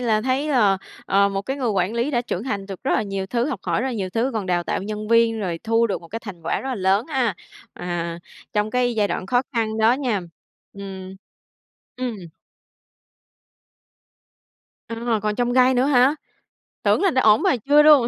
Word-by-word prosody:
là 220 -3 +2
thấy, 260 +5 0
ờ, 210 -8 +4 0.3
ờ, 200 +1 +4
một 195 0 -3
cái 270 +6 -3
người 255 -4 -1
quản 195 +1 0
lý 240 +5 0
đã 240 -3 +1
trưởng 225 -3 -4
thành 200 -6 -3
được 195 -2 -8
rất - - 0
là - - +2
nhiều 195 -1 -4
thứ, 240 +5 0
học 240 -9 -4
hỏi - - 0
rất 265 - -1
là 260 - -2
nhiều 195 -5 -3
thứ, 235 +5 0
còn 215 -4 -3
đào 175 -1 +1
tạo - - -2
nhân 210 +1 -5
viên, 230 -1 +3
rồi 175 -4 -2
thu 230 +1 +3
được 200 - -3
một 170 - -14
cái 225 - -4
thành 185 -7 -9
quả 165 - -1
rất 270 - -5
là 260 - -1
lớn 195 +3 +1
ha, 255 - 0 0.4
à, 170 -1 -4 0.3
trong 210 +1 0
cái 245 -1 +1
giai 205 -2 +1
đoạn 185 - -3
khó 245 +2 +2
khăn 220 -2 -1
đó 220 +2 +5
nha. 250 -7 0 0.5
Ừm. 190 -1 -8 0.8
Ừm. 250 -3 -3 2.7
À, 230 -1 -1
còn 210 0 0
chông 245 +1 0
gai 255 0 +5
nữa 250 +1 +3
hả? 265 0 +4 0.7
Tưởng - - +3
là 385 -3 +3
đã 260 - +2
ổn, 215 -1 +5
mà - - +3
chưa 295 +1 +7
luôn. 295 -6 +7
225 Hz, 210 wpm, -22 LUFS, 195-250 Hz, 2.7 s, chưa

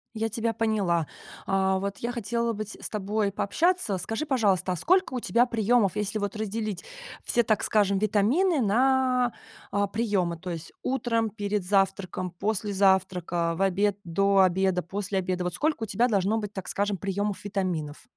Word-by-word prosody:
Я 220 +1 0
тебя 225 +1 -1
поняла. 200 -8 +1 0.4
А, 190 0 +1
вот 200 +1 -3
я 235 - -2
хотела 235 0 -1
бы 215 0 -4
те 210 - -11
с - - -4
тобой 210 0 -1
пообщаться. 320 - +1
Скажи, 225 +9 -3
пожалуйста, 205 - +1
а - - -2
сколько 370 - +2
у 255 - -1
тебя 235 +2 +3
приемов, 230 -4 +2
если 210 +1 -1
вот 205 0 -3
разделить 215 -2 -3 0.4
все, 240 - +2
так 215 -1 +1
скажем, 200 -2 +2
витамины 220 - +2
на 250 +2 +2 0.4
а, 200 0 +1
приемы, 200 -5 0
то 180 +2 -7
есть 165 -2 -6
утром, 230 -3 0
перед 205 -1 -2
завтраком, 190 -2 0
после 205 +3 -2
завтрака, 180 -3 +1
в 165 - -4
обед, 195 +1 +2
до 195 +3 +2
обеда, 185 0 +3
после 195 +1 -2
обеда. 185 -1 -2
Вот 180 - -2
сколько 300 - 0
у - - 0
тебя 230 +4 +1
должно 205 +1 +1
быть, 210 -2 -5
так 190 - -6
скажем, 200 0 -1
приемов 200 +1 -2
витаминов? 180 -7 -3
205 Hz, 170 wpm, -27 LUFS, 190-225 Hz, 0.4 s, тебя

